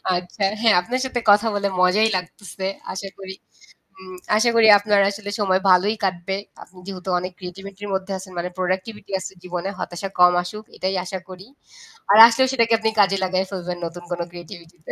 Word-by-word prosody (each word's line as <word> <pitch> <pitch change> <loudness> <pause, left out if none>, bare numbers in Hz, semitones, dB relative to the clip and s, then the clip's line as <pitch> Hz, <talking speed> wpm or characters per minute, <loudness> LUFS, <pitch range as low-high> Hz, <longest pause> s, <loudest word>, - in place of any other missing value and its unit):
আচ্ছা 180 +3 -4 0.2
হ্যাঁ, 225 -3 +5
আপনার 250 +8 -3
সাথে 250 -2 -2
কথা 205 +2 +5
বলে 200 0 0
মজাই 205 +5 +4
লাগতেছে। 190 +1 -8 0.3
আশা 195 +1 -6
করি 190 -1 -8 0.6
হুম, 185 -1 -12 0.2
আশা 235 +2 +3
করি 225 -1 +6
আপনার 205 0 +2
আসলে 205 0 -7
সময় 190 -1 +2
ভালোই 200 +4 +4
কাটবে। 185 +1 -2 0.3
আপনি 185 0 -16
যেহেতু 190 -1 -8
অনেক 180 +1 -5
ক্রিয়েটিভিটি 195 +2 -10
র - - -5
মধ্যে 190 +1 -3
আছেন 185 0 -11
মানে 175 +1 -2
প্রোডাক্টিভিটি 190 +3 -4
আছে 190 - -7
জীবনে 180 +1 -4
হতাশা 175 +3 -5
কম 180 0 +7
আসুক 210 +4 -8
এটাই 190 +1 -2
আশা 190 +1 -5
করি। 185 +2 -11 0.7
আর 210 - +6
আসলেও 260 +3 +2
সেটাকে 230 -3 +2
আপনি 220 0 0
কাজে 195 -1 +4
লাগায় 185 +1 0
ফেলবেন 180 -2 -5
নতুন 175 +1 -8
কোন 175 - -3
ক্রিয়েটিভিটি 175 0 -12
তে। - - -6
190 Hz, 185 wpm, -21 LUFS, 180-205 Hz, 0.7 s, কম